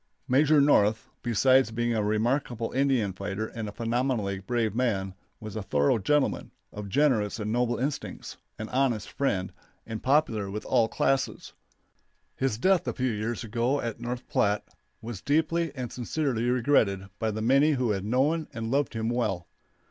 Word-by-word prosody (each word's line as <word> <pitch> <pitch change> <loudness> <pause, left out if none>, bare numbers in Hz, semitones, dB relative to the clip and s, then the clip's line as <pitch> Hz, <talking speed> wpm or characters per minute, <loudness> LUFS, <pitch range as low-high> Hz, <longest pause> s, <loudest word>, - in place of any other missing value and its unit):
Major 145 +3 +4
North, 110 -7 +3
besides 130 +2 +4
being 120 +1 -1
a 110 - +1
remarkable 115 +2 0
Indian 130 -7 +1
fighter 100 +3 -4
and 110 -1 -6
a - - -7
phenomenally 115 -3 -1
brave 110 +1 -1
man, 105 -6 0 0.3
was 110 -1 -8
a 110 - -2
thorough 75 +2 +2
gentleman, 145 +8 +1 0.2
of 105 -1 -6
generous 115 -5 +2
and 105 0 -2
noble 120 0 +1
instincts, 135 +4 -4 0.2
an 110 - -5
honest 125 -6 0
friend, 95 -10 -1 0.3
and 110 -1 -6
popular 130 -8 +2
with 105 +2 -5
all 115 - +3
classes. 135 +3 -1 0.8
His 130 -5 -1
death 185 +8 +2
a - - 0
few 130 -1 -1
years 110 +2 -3
ago 120 +5 0
at 115 -3 -4
North 120 +1 -5
Platte 105 0 +1 0.4
was 110 -4 -6
deeply 160 +2 +1
and 125 -3 -5
sincerely 125 -2 -1
regretted 115 -7 +2
by 110 - 0
the 110 0 -3
many 140 +6 +4
who 125 -5 0
had 95 -2 -2
known 140 +9 +1
and 115 0 -4
loved 140 -3 0
him 110 0 -1
well. 115 -7 -1
120 Hz, 165 wpm, -27 LUFS, 105-135 Hz, 0.8 s, Major